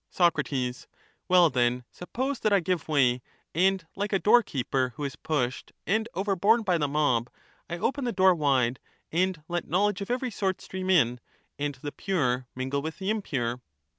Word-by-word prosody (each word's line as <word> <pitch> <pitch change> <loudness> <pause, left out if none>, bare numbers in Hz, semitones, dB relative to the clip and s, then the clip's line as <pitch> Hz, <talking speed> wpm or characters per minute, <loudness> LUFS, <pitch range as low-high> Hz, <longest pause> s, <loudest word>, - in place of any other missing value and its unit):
Soc, 175 -2 +3 0.9
Well, 180 -3 +5
then, 125 0 +1
suppose 260 +9 -3
that 215 - +1
I 200 - +5
give 180 0 -2
way, 130 -5 +3 0.3
and, 185 +1 +2
like 205 +1 -2
a 195 - +3
doorkeeper 135 - +2
who 150 - -6
is 140 - -3
pushed 130 -5 -2
and 220 +5 0
overborne 200 +4 +2
by 180 -4 +1
the 145 - +1
mob, 140 -5 +1 0.4
I 175 - -3
open 270 +9 -1
the 240 - 0
door 190 -2 +5
wide, 130 -6 +1 0.3
and 180 -1 0
let 175 -1 -3
knowledge 200 +3 +1
of 200 - -5
every 250 0 -1
sort 190 -2 -1
stream 185 0 -5
in, 125 -10 +3 0.4
and 145 -1 -2
the 145 - -3
pure 130 -11 -1
mingle 130 +2 -1
with 160 +2 -5
the 195 +2 -1
impure 125 - -2
175 Hz, 170 wpm, -27 LUFS, 135-195 Hz, 0.9 s, Well